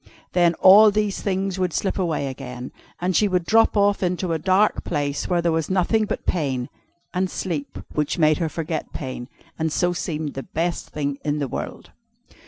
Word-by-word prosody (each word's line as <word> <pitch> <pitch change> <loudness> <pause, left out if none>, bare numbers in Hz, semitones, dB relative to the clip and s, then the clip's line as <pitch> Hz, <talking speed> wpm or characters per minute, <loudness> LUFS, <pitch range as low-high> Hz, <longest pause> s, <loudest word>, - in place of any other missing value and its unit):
Then 175 -2 +3
all 205 +5 +8
these 210 -1 -1
things 190 -1 -1
would 180 -3 0
slip 195 - -1
away 165 -6 0
again, 125 -2 -7 0.3
and 180 +1 -1
she 210 - +4
would 180 -3 0
drop 225 +1 +4
off 205 0 +3
into 180 -1 -1
a 160 - -1
dark 190 +5 +2
place, 145 -1 -2
where 175 -2 +1
there 170 - +2
was 160 -2 -1
nothing 195 +4 +2
but - - -4
pain, 135 -7 -1 0.4
and 185 0 0
sleep, 160 -8 -4 0.2
which 150 +2 -1
made 155 -2 +3
her 165 -2 0
forget 160 0 -4
pain, 130 -3 -6 0.3
and 160 0 0
so 175 +3 +1
seemed 155 -4 -3
the 135 - -4
best 170 +5 -3
thing 145 -1 -3
in 150 0 0
the 145 -2 -1
world. - - -6
170 Hz, 190 wpm, -23 LUFS, 150-185 Hz, 0.4 s, all